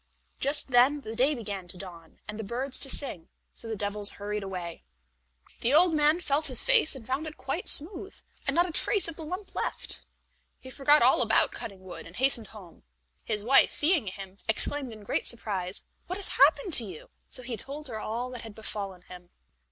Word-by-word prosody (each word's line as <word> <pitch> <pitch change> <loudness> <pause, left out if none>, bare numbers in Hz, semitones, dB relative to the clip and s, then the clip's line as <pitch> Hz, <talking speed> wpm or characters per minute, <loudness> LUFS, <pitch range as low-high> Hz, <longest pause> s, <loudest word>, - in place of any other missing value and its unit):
Just 285 +1 -1
then 260 +4 +4
the 220 -3 -7
day 270 +5 +2
began 200 -6 -6
to 180 - -9
dawn, 170 -4 -11
and 210 +1 -7
the - - -4
birds 250 +6 -3
to 275 - +2
sing, 250 - -2 0.2
so 230 - -5
the 225 - -3
devils 205 0 +1
hurried 210 +1 -4
away. 180 -4 -7 0.8
The 250 +5 +1
old 345 +1 +5
man 305 +2 +3
felt 300 -2 +1
his 255 -3 +2
face 470 - +4
and 250 -4 -11
found 270 +6 -3
it 310 - -9
quite - - -4
smooth, 365 +5 +3 0.3
and - - 0
not 345 +1 +4
a - - -6
trace 390 +4 +3
of 330 - -6
the 320 - -9
lump 370 +5 -7
left. - - -4 0.6
He 260 - -12
forgot 290 +1 +4
all 255 +1 +4
about 225 -2 +4
cutting 195 -3 -9
wood, 185 -2 -10
and 165 - -14
hastened 245 -3 +1
home. 190 -6 -14 0.4
His 210 -1 -2
wife, 265 +5 +6
seeing 305 - +3
him, 190 0 -8
exclaimed 265 +4 +3
in 215 -2 -12
great - - -2
surprise, 195 -5 -2 0.2
"What 365 - -4
has 405 - -1
happened 385 -8 +3
to 245 - +4
you?" 185 -7 -11 0.2
So 255 - -5
he 245 -1 -4
told 285 +6 -4
her 220 -4 -5
all 235 +4 -4
that 250 -2 -6
had 220 -2 -10
befallen 200 -4 -5
him. 180 -1 -13
240 Hz, 205 wpm, -28 LUFS, 205-295 Hz, 0.8 s, wife